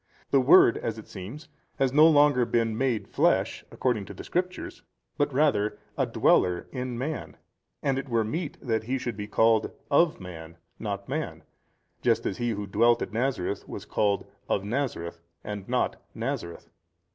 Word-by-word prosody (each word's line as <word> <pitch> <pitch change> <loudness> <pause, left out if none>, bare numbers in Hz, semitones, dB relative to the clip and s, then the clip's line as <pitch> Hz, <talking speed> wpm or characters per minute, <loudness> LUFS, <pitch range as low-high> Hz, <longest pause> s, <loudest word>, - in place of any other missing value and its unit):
The 140 - +5
Word 130 -2 +6
(as 110 -1 -3
it 110 - -10
seems) 105 - -8 0.3
has 135 -1 +1
no 155 +2 +8
longer 145 -4 +5
been 115 -2 +1
made 125 -2 0
flesh, - - +1
according 120 -6 -1
to - - -10
the - - -8
Scriptures, 180 +1 -3 0.3
but 145 - +1
rather 115 -7 +2 0.2
a - - +1
dweller 90 -1 +3
in 125 -2 -4
man, 145 +6 -4 0.5
and 135 -1 +1
it 135 - -7
were 115 -2 +2
meet 150 +8 -4
that 110 -2 0
He 130 +3 0
should 120 -3 -4
be 105 0 -5
called, 110 +1 +3 0.2
of 160 +3 +4
man, 85 -2 -9 0.2
not 100 -2 -4
man, 150 +3 -4 0.6
just - - +2
as - - -2
he 120 0 0
who 105 -2 -2
dwelt 115 +4 +3
at - - -7
Nazareth 115 -5 -1
was - - -7
called, 100 -1 0 0.2
of 100 - +1
Nazareth, 105 -8 -3 0.5
not - - 0 0.2
Nazareth. 85 -1 -4
115 Hz, 165 wpm, -27 LUFS, 105-135 Hz, 0.6 s, no